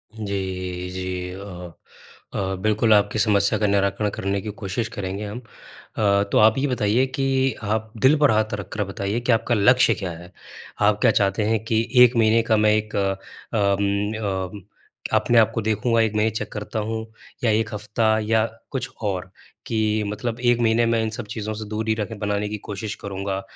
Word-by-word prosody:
जी, 95 Hz, -3 st, -4 dB
जी। 90 Hz, 0 st, -4 dB
अ, 90 Hz, -2 st, -8 dB, 0.6 s
अ, 95 Hz, -1 st, -2 dB
बिल्कुल, 110 Hz, +1 st, +3 dB
आपकी 105 Hz, +1 st, +2 dB
समस्या 105 Hz, -1 st, +2 dB
का 105 Hz, -, +2 dB
निराकरण 100 Hz, +1 st, +1 dB
करने 100 Hz, 0 st, -2 dB
की 105 Hz, -, -6 dB
कोशिश 105 Hz, +3 st, -2 dB
करेंगे 100 Hz, +1 st, -4 dB
हम। 105 Hz, +4 st, -6 dB
अ, 105 Hz, -3 st, -2 dB
तो -, -, +3 dB
आप 110 Hz, +2 st, +5 dB
ये 140 Hz, +2 st, +1 dB
बताइए 120 Hz, -1 st, +2 dB
कि 135 Hz, -1 st, +1 dB
आप 110 Hz, +1 st, -2 dB
दिल 145 Hz, +4 st, +6 dB
पर 145 Hz, -5 st, +5 dB
हाथ 110 Hz, 0 st, +1 dB
रखकर 105 Hz, +2 st, -3 dB
बताइए 100 Hz, +3 st, -3 dB
कि, 120 Hz, +1 st, 0 dB
आपका 115 Hz, +1 st, +2 dB
लक्ष्य 125 Hz, +5 st, +5 dB
क्या 95 Hz, -4 st, -4 dB
है? 85 Hz, +2 st, -11 dB, 0.5 s
आप 105 Hz, 0 st, +3 dB
क्या -, -, +5 dB
चाहते 100 Hz, +1 st, +1 dB
हैं 110 Hz, 0 st, 0 dB
कि, 115 Hz, 0 st, +1 dB, 0.2 s
1 125 Hz, 0 st, +5 dB
महीने 115 Hz, 0 st, +4 dB
का 110 Hz, -, +5 dB
मैं 105 Hz, 0 st, +4 dB
एक 110 Hz, 0 st, -2 dB
अ 100 Hz, -1 st, +1 dB, 0.5 s
म 100 Hz, 0 st, +1 dB
अ, 100 Hz, -2 st, -3 dB, 0.6 s
अपने 120 Hz, -, +2 dB
आप 110 Hz, -, +5 dB
को 115 Hz, -, 0 dB
देखूँगा 110 Hz, +2 st, +1 dB
1 110 Hz, -1 st, 0 dB
महीने 105 Hz, +1 st, +2 dB
चेक 110 Hz, -, -5 dB
करता 105 Hz, +1 st, -4 dB
हूँ? 110 Hz, 0 st, -3 dB, 0.4 s
या 115 Hz, -, +3 dB
1 110 Hz, +1 st, 0 dB
हफ़्ता 110 Hz, +1 st, +1 dB
या 110 Hz, +1 st, +2 dB, 0.3 s
कुछ 135 Hz, -1 st, -3 dB
और, 95 Hz, -3 st, -3 dB, 0.3 s
कि 110 Hz, -1 st, 0 dB
मतलब 115 Hz, +3 st, -4 dB
1 120 Hz, -1 st, +2 dB
महीने 115 Hz, 0 st, +3 dB
में 115 Hz, 0 st, +2 dB
इन 110 Hz, -, -1 dB
सब 115 Hz, +1 st, -6 dB
चीज़ों 110 Hz, -1 st, -3 dB
से 110 Hz, 0 st, -6 dB
दूर 110 Hz, +1 st, -3 dB
ही 110 Hz, -, +4 dB
रखे 110 Hz, +1 st, -3 dB
बनाने 105 Hz, 0 st, -1 dB
की 105 Hz, -, -4 dB
कोशिश 105 Hz, +1 st, -4 dB
करूँगा, 100 Hz, 0 st, -3 dB
105 Hz, 190 wpm, -23 LUFS, 100-110 Hz, 0.6 s, दिल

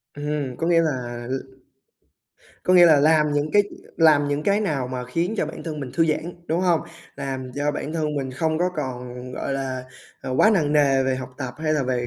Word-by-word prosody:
Ừm, 145 Hz, -3 st, -3 dB
có 165 Hz, -, -1 dB
nghĩa 165 Hz, -1 st, +4 dB
là 120 Hz, -6 st, -3 dB
l -, -, -1 dB, 1.3 s
có 185 Hz, -, +3 dB
nghĩa 175 Hz, -1 st, +8 dB
là 150 Hz, -3 st, +6 dB
làm 150 Hz, -1 st, +4 dB
những 145 Hz, +1 st, 0 dB
cái 205 Hz, 0 st, +6 dB, 0.3 s
làm 150 Hz, -3 st, +5 dB
những 145 Hz, +1 st, -1 dB
cái 200 Hz, +4 st, +2 dB
nào 140 Hz, -10 st, -1 dB
mà 125 Hz, -1 st, -4 dB
khiến 170 Hz, -, -1 dB
cho 155 Hz, -, 0 dB
bản 160 Hz, -, -8 dB
thân 155 Hz, -3 st, -5 dB
mình 130 Hz, -2 st, -5 dB
thư 165 Hz, -1 st, +3 dB
giãn, 160 Hz, +3 st, -1 dB
đúng 165 Hz, +3 st, 0 dB
hông? 175 Hz, -3 st, +3 dB, 0.4 s
Làm 130 Hz, -2 st, -5 dB
cho 145 Hz, +1 st, 0 dB
bản 150 Hz, +1 st, -4 dB
thân 155 Hz, -2 st, -1 dB
mình 135 Hz, -2 st, -2 dB
không 160 Hz, +4 st, -1 dB
có 180 Hz, +1 st, +2 dB
còn, 125 Hz, -4 st, -4 dB, 0.2 s
gọi 140 Hz, -, -3 dB
là, 130 Hz, -2 st, -3 dB, 0.4 s
ờ, 130 Hz, -, -4 dB
quá 215 Hz, -, +6 dB
nặng 155 Hz, -8 st, +2 dB
nề 135 Hz, -3 st, +4 dB
về 130 Hz, 0 st, 0 dB
học 130 Hz, -1 st, -6 dB
tập 130 Hz, -3 st, -5 dB
hay 155 Hz, -1 st, 0 dB
là 145 Hz, -, +1 dB
về 125 Hz, -1 st, -1 dB
145 Hz, 225 wpm, -23 LUFS, 130-160 Hz, 1.3 s, nghĩa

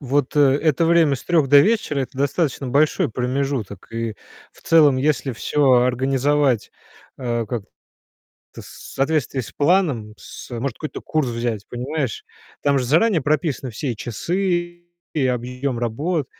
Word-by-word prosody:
вот, 140 Hz, 0 st, -1 dB
э, 145 Hz, -, +5 dB, 0.2 s
это 155 Hz, 0 st, +2 dB
время 165 Hz, -4 st, +4 dB
с -, -, -13 dB
3 160 Hz, -6 st, +2 dB
до 145 Hz, +1 st, +8 dB
вечера- 205 Hz, -6 st, +1 dB
это 130 Hz, 0 st, -5 dB
достаточно 140 Hz, 0 st, -1 dB
большой 150 Hz, +4 st, +2 dB
промежуток. 125 Hz, -5 st, -3 dB
И 115 Hz, -1 st, -3 dB, 0.4 s
в -, -, -21 dB
целом, 150 Hz, -5 st, +5 dB
если 140 Hz, 0 st, 0 dB
всё 140 Hz, +3 st, +1 dB
организовать, 130 Hz, 0 st, +1 dB, 0.5 s
э, 120 Hz, -2 st, -2 dB
как-то 110 Hz, -2 st, -4 dB, 1.0 s
в -, -, -14 dB
с -, -, -12 dB
соответствии 140 Hz, -2 st, 0 dB
с 115 Hz, -, -9 dB
планом, 145 Hz, -, +1 dB
с, -, -, -11 dB
э 120 Hz, -, -5 dB
Может, 130 Hz, -2 st, -3 dB
какой-то 155 Hz, -, -6 dB
курс 155 Hz, -5 st, -1 dB
взять, 115 Hz, -3 st, -3 dB
понимаешь? 150 Hz, -, -3 dB, 0.4 s
Там 140 Hz, -1 st, +2 dB
же 125 Hz, -, -2 dB
заранее 165 Hz, -, +3 dB
прописаны 145 Hz, -3 st, -1 dB
все 125 Hz, +3 st, -3 dB
и -, -, -9 dB
часы, 175 Hz, -, -2 dB, 0.3 s
и 140 Hz, -4 st, +1 dB
объем 125 Hz, +1 st, -2 dB
работ, 140 Hz, +6 st, -1 dB
140 Hz, 155 wpm, -21 LUFS, 125-155 Hz, 1.0 s, до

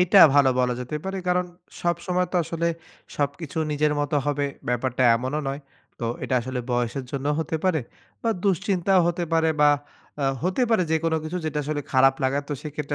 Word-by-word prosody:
এইটা 180 Hz, +2 st, +5 dB, 0.2 s
ভালো 140 Hz, -2 st, +6 dB
বলা 125 Hz, -1 st, +2 dB
যেতে 125 Hz, +5 st, -4 dB
পারে। 195 Hz, 0 st, -3 dB
কারন 180 Hz, 0 st, +2 dB, 0.3 s
সবসময় 175 Hz, +1 st, 0 dB
তো -, -, +1 dB
আসলে 170 Hz, +1 st, -2 dB, 0.5 s
সবকিছু 145 Hz, +3 st, -2 dB
নিজের 150 Hz, 0 st, +2 dB
মত 145 Hz, +1 st, -2 dB
হবে 145 Hz, -1 st, 0 dB, 0.2 s
ব্যাপারটা 125 Hz, +1 st, 0 dB
এমনও 130 Hz, +5 st, -2 dB
নয়। 140 Hz, +2 st, -4 dB, 0.4 s
তো 120 Hz, -, -2 dB, 0.2 s
এটা 130 Hz, -, -1 dB
আসলে 130 Hz, +1 st, -4 dB
বয়সের 120 Hz, +2 st, -1 dB
জন্যও 140 Hz, +1 st, -1 dB
হতে 160 Hz, 0 st, -2 dB
পারে 180 Hz, -5 st, +2 dB, 0.4 s
বা 230 Hz, -, +1 dB
দুশ্চিন্তাও 190 Hz, 0 st, +2 dB
হতে 175 Hz, 0 st, -1 dB
পারে 160 Hz, 0 st, +3 dB
বা 145 Hz, 0 st, +7 dB, 0.5 s
অ্যা 140 Hz, -, 0 dB, 0.2 s
হতে 185 Hz, +8 st, +1 dB
পারে 220 Hz, -5 st, +4 dB
যেকোনো 160 Hz, 0 st, +1 dB
কিছু 165 Hz, +3 st, -4 dB
যেটা 155 Hz, -1 st, -2 dB
আসলে 150 Hz, 0 st, -2 dB
খারাপ 135 Hz, +1 st, +5 dB
লাগা, 135 Hz, +2 st, +1 dB
তো -, -, -2 dB
সেক্ষেত্রে 150 Hz, -1 st, -4 dB
150 Hz, 180 wpm, -24 LUFS, 135-175 Hz, 0.5 s, বা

